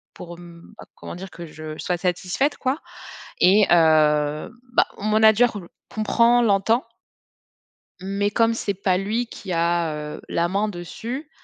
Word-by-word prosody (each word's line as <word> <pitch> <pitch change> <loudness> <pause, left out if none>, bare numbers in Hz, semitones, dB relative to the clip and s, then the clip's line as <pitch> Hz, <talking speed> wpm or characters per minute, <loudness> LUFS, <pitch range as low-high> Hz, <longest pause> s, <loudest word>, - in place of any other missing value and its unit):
pour 175 -1 -10
m 170 +1 -14
bah - - -11
comment - - -9
dire? 190 +2 -8
Que 170 - -9
je 155 -1 -9
sois 180 - -2
satisfaite, 180 - -1
quoi, 265 +3 -1 0.6
et 195 +4 +5
heu, 155 0 +3 0.2
bah, - - +4
mon 210 +1 -2
manager 220 +1 +4
le 170 - -13 0.2
comprend, 235 +2 +3
l'entend. 220 +3 +2 1.2
Mais 200 +2 -1
comme 230 +2 +2
c'est 210 -3 -2
pas 185 -1 0
lui 215 +6 -1
qui 200 -4 -8
a, 170 -1 0 0.2
heu, - - -12
la 170 +1 0
main 200 +4 0
dessus, 230 - -6
190 Hz, 150 wpm, -22 LUFS, 170-220 Hz, 1.2 s, et